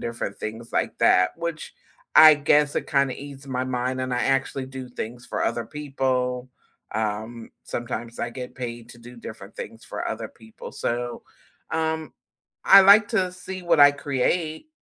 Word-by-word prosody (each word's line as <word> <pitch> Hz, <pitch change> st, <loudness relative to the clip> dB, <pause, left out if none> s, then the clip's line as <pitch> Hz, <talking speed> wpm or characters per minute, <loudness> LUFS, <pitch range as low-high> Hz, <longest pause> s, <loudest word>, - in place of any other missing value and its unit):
different 115 Hz, -4 st, -5 dB
things 110 Hz, +2 st, -7 dB
like -, -, -1 dB
that, 90 Hz, 0 st, +5 dB
which 170 Hz, -2 st, -5 dB, 0.4 s
I 155 Hz, 0 st, +10 dB
guess 145 Hz, 0 st, +2 dB
it -, -, -2 dB
kinda 140 Hz, -3 st, +2 dB
ease 140 Hz, -1 st, -10 dB
my 130 Hz, -1 st, -2 dB
mind, 130 Hz, 0 st, -2 dB
and 130 Hz, -1 st, -3 dB
I 125 Hz, -, 0 dB
actually 135 Hz, 0 st, 0 dB
do 130 Hz, -1 st, -8 dB
things 120 Hz, 0 st, -7 dB
for -, -, -2 dB
other 120 Hz, -1 st, -2 dB
people, 130 Hz, -3 st, -2 dB, 0.5 s
um, 110 Hz, +2 st, -3 dB
sometimes 120 Hz, -1 st, -5 dB
I 120 Hz, -, -2 dB
get 125 Hz, +1 st, -8 dB
paid 120 Hz, -2 st, -6 dB
to 120 Hz, -, -14 dB
do 120 Hz, +1 st, -13 dB
different 105 Hz, -3 st, -10 dB
things 115 Hz, -, -9 dB
for -, -, -5 dB
other 110 Hz, 0 st, -4 dB
people, 110 Hz, -1 st, -12 dB
so, 120 Hz, 0 st, -3 dB, 0.5 s
um, 160 Hz, -1 st, -2 dB, 0.5 s
I 195 Hz, -, +9 dB
like 205 Hz, +2 st, +7 dB
to 185 Hz, -6 st, 0 dB
see 185 Hz, 0 st, -8 dB
what 170 Hz, -3 st, +3 dB
I 145 Hz, 0 st, +9 dB
create, 155 Hz, -, -1 dB
130 Hz, 165 wpm, -24 LUFS, 120-150 Hz, 0.5 s, I